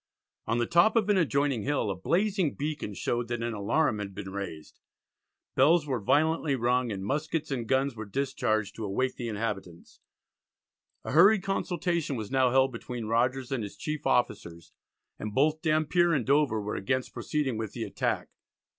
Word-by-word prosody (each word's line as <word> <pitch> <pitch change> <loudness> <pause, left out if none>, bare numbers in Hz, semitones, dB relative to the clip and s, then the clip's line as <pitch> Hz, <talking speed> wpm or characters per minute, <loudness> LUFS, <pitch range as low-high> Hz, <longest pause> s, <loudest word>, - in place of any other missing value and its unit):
On 115 - +1
the 120 - +1
top 170 - +4
of 215 -3 +2
an 205 - +4
adjoining 140 -7 +1
hill 135 -5 0
a - - -3
blazing 185 - 0
beacon 145 -8 -4
showed 120 +3 -1
that 120 0 -3
an 120 0 -2
alarum 110 +3 +1
had 100 -2 -6
been 95 -1 -6
raised. 95 -6 -7 0.7
Bells 155 +4 +4
were 130 -4 -1
violently 155 +5 +2
rung, 125 0 +1
and 95 -1 -4
muskets 155 +4 -2
and 120 -4 -2
guns 135 0 +1
were 110 -1 -7
discharged 110 -3 -1
to 115 - -5
awake 130 +6 -1
the 120 - -5
inhabitants. 100 -6 -5 1.0
A - - -5
hurried 190 +7 +6
consultation 175 -5 -1
was 110 -2 -5
now 130 -1 +3
held 130 +1 +3
between 120 -1 -6
Rogers 125 +4 0
and 130 -3 -1
his 100 - -8
chief 150 -2 -4
officers, 85 -10 -1 0.5
and 105 -1 -5
both 155 +4 +2
Dampier 160 +2 +2
and 135 -7 0
Dover 140 -5 +2
were 105 0 -4
against 130 +6 -2
proceeding 130 -1 -2
with 110 -2 -4
the - - -4
attack. - - -2
130 Hz, 175 wpm, -28 LUFS, 110-150 Hz, 1.0 s, hurried